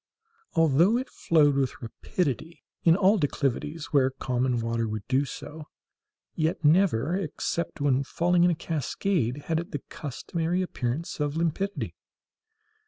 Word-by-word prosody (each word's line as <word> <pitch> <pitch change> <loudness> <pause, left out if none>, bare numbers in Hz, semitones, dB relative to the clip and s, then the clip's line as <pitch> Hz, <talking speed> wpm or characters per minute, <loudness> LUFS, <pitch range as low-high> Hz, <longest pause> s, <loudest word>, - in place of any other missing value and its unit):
Although 165 - +4
it 260 - -4
flowed 150 -3 +3
with 135 -2 -1
rapidity 155 +5 -3 0.2
in 165 -1 +6
all 200 +2 +4
declivities 145 +1 -2
where 135 -2 +4
common 125 -1 -1
water 115 0 -1
would 105 -2 -5
do 135 +2 +2
so, 150 +3 -8 0.7
yet 160 0 -1
never, 165 - +3
except 170 -2 -3
when 140 -1 +2
falling 175 +4 +2
in 175 - +5
a 170 - +1
cascade, 150 - -1
had 160 -1 0
it 170 - -6
the 145 - -4
customary 165 +4 -2
appearance 140 -1 -3
of 145 +1 -1
limpidity. 170 +5 -1
155 Hz, 135 wpm, -27 LUFS, 135-170 Hz, 0.7 s, in